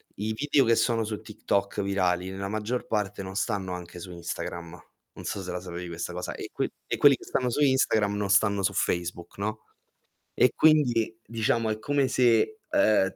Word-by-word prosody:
i 105 +2 -2
video 140 +2 +2
che 115 0 +4
sono 115 -2 +2
su 105 -1 -4
TikTok 100 -2 -1
virali, 95 -2 0
nella 100 +1 -4
maggior 110 +4 -2
parte 105 -2 -1
non 95 +1 -7
stanno 100 -4 -1
anche 90 0 -8
su 90 +1 -8
Instagram, 85 0 -6 0.3
non 90 - -10
so 100 0 -3
se 90 -1 -5
la 90 - -3
sapevi 90 -1 -6
questa 85 +1 -5
cosa, 90 0 -4
e - - -7
que - - -1 0.2
e - - -1
quelli 140 -2 +7
che - - -13
stanno 125 -1 0
su 145 +5 -1
Instagram 110 -7 +3
non 100 -1 -2
stanno 100 0 +3
su - - +1
Facebook, 85 0 -2
no, 110 +1 -3 0.7
e - - +4
quindi, 120 -8 +3
diciamo, 115 0 0
è 110 0 -2
come 140 +3 +1
se, 125 - +3
uhm, 95 -3 +3
105 Hz, 190 wpm, -27 LUFS, 90-115 Hz, 0.7 s, quelli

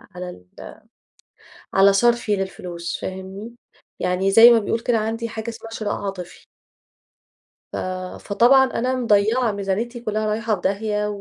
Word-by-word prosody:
على 180 0 -6
ال 90 - -13 0.9
على 195 +1 +5
صرفي 235 0 +2
للفلوس 180 -3 -5
فاهمني 190 +4 -7 0.5
يعني 185 +2 0
زي 225 +4 +9
ما 230 - +5
بيقول 225 +2 -2
كده 235 0 0
عندي 225 +1 -3
حاجة 220 0 -5
اسمها 225 0 -9
شراء 215 -2 -3
عاطفي. 195 -3 -7 1.3
ف - - -4 0.4
فطبعًا 245 +6 +4
أنا 255 0 -1
مضيّعة 225 0 +2
ميزانيتي 205 +5 -3
كلها 215 -2 -2
رايحة 215 +1 0
في 185 - -6
داهية، 210 +2 -1
215 Hz, 135 wpm, -22 LUFS, 195-230 Hz, 1.3 s, زي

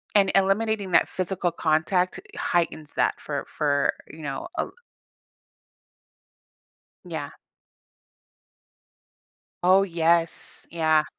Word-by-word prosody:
and 195 -2 +5
eliminating 195 +1 +2
that 170 - +4
physical 185 -1 -1
contact 165 +3 +1 0.2
heightens 165 -3 -1
that - - +2
for - - -4
for, 145 -2 +1
you 160 - -11
know, 140 -2 -4
a 320 - +1
li - - -13 2.3
Yeah. 160 -5 -5 2.3
Oh, 185 +2 +6
yes, 170 -2 +1
yeah. 155 -2 +3
170 Hz, 90 wpm, -25 LUFS, 155-190 Hz, 2.3 s, Oh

